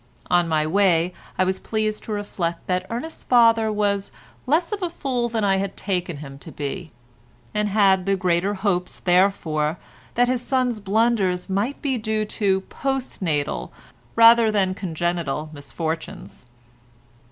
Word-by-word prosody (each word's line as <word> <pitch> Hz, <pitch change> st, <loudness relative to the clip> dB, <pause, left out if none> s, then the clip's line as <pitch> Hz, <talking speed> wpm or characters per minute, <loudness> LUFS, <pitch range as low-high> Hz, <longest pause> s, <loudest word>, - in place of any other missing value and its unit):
On 175 Hz, -1 st, +4 dB
my 155 Hz, -1 st, +1 dB
way 180 Hz, 0 st, +2 dB, 0.2 s
I -, -, +3 dB
was 190 Hz, 0 st, 0 dB
pleased 215 Hz, -1 st, -2 dB
to -, -, -6 dB
reflect 185 Hz, -5 st, -3 dB
that 180 Hz, 0 st, -1 dB
Ernest's 245 Hz, +8 st, -5 dB
father 230 Hz, -3 st, +4 dB
was 200 Hz, -1 st, 0 dB, 0.4 s
less 325 Hz, -, +2 dB
of 415 Hz, -1 st, -3 dB
a 355 Hz, -, -1 dB
fool 255 Hz, -7 st, -2 dB
than 225 Hz, -2 st, -1 dB
I 195 Hz, -1 st, +3 dB
had 195 Hz, 0 st, -3 dB
taken 180 Hz, -4 st, -2 dB
him 140 Hz, -1 st, -9 dB
to 160 Hz, -, -10 dB
be, 155 Hz, +5 st, -5 dB, 0.6 s
and 210 Hz, 0 st, 0 dB
had 195 Hz, -2 st, +3 dB
the 195 Hz, -, +3 dB
greater 185 Hz, +2 st, +1 dB
hopes, 190 Hz, -2 st, -1 dB
therefore, 175 Hz, -4 st, +1 dB, 0.4 s
that 245 Hz, +1 st, +4 dB
his 250 Hz, -1 st, 0 dB
son's 250 Hz, -3 st, 0 dB
blunders 200 Hz, -3 st, +1 dB
might 210 Hz, +9 st, -1 dB
be 265 Hz, -4 st, 0 dB
due 215 Hz, 0 st, -1 dB
to 195 Hz, -2 st, 0 dB
postnatal, 190 Hz, -, -2 dB, 0.5 s
rather 230 Hz, -1 st, +7 dB
than 195 Hz, -3 st, +1 dB
congenital 170 Hz, -4 st, -2 dB
misfortunes. 155 Hz, -2 st, -6 dB
195 Hz, 145 wpm, -23 LUFS, 175-225 Hz, 0.6 s, rather